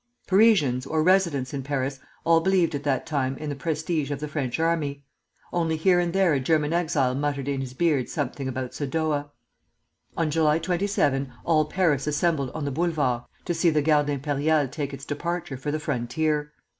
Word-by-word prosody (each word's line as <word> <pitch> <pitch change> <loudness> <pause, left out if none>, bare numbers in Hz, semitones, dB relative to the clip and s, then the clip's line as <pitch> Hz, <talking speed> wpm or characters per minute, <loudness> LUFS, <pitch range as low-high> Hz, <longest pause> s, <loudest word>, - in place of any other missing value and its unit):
] - - -42
Parisians 185 - +4
or 155 +1 +1
residents 170 -8 +2
in 140 - -2
Paris 135 0 -2 0.2
all 165 0 +4
believed 185 -2 +2
at 145 - -2
that 135 -3 0
time 135 -3 -1
in 155 - -5
the 145 - -3
prestige 155 0 -2
of 145 -1 -3
the 150 - -4
French 145 -3 -3
army; 150 -4 -1 0.5
only 165 -2 0
here 180 +2 +4
and 175 -1 0
there 190 -3 +3
a 140 - +2
German 150 +3 +1
exile 155 -7 +1
muttered 140 0 -2
in 140 -1 -1
his 130 -1 -6
beard 150 -5 +1
something 140 -2 -3
about 130 -1 -4
Sadowa. 145 0 -1 0.9
On 160 -2 +1
July 155 0 +3
27 165 -7 0
all 155 -2 +3
Paris 150 -4 +1
assembled 150 -2 +1
on 155 -2 -3
the 140 - -2
Boulevards 145 -6 0 0.2
to 175 - 0
see 170 +1 +3
the 150 -2 +1
Garde 150 -1 +3
Impériale 145 0 0
take 145 -2 -3
its 135 0 -8
departure 170 0 -3
for 135 +3 -5
the 155 +1 -1
frontier. 150 +2 -1
150 Hz, 185 wpm, -25 LUFS, 140-165 Hz, 0.9 s, Parisians